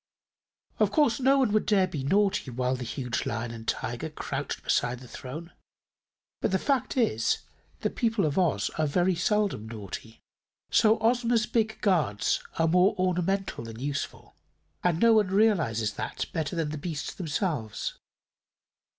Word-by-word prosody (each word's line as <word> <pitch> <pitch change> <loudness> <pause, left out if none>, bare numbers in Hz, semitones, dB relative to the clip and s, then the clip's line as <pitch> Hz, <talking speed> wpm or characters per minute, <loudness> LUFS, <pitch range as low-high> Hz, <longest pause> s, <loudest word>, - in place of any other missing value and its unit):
Of - - +4
course 290 -7 +3
no 270 +1 +4
one 260 -6 +3
would 215 - +2
dare 200 -3 +4
be 155 -7 -5
naughty 195 0 +2
while 125 +1 0
the 125 - -5
huge 125 -1 -3
Lion 120 0 -3
and 115 -1 -9
Tiger 120 +7 -2
crouched 145 -2 -4
beside 120 0 +1
the 125 - -12
throne; 155 +9 -8 0.9
but - - +1
the 190 - +2
fact 275 +4 0
is, 115 - +1 0.4
the - - 0
people 225 -5 +1
of 145 -2 0
Oz 150 - +1
are 155 - +2
very 180 +5 +2
seldom 180 - 0
naughty. 110 0 -8 0.5
So 220 0 +5
Ozma's 235 0 +2
big 220 -1 0
guards 155 - +1 0.2
are 165 - +3
more 180 +4 +4
ornamental 185 -3 0
than 115 0 -8
useful, 140 +1 -4 0.5
and 175 -2 +2
no 230 +2 +6
one 215 -3 +4
realizes 170 - +2
that - - -4
better 160 +1 -2
than 165 -3 -1
the 155 0 -5
beasts 155 -1 -4
themselves. 155 - -3
165 Hz, 155 wpm, -28 LUFS, 125-210 Hz, 0.9 s, no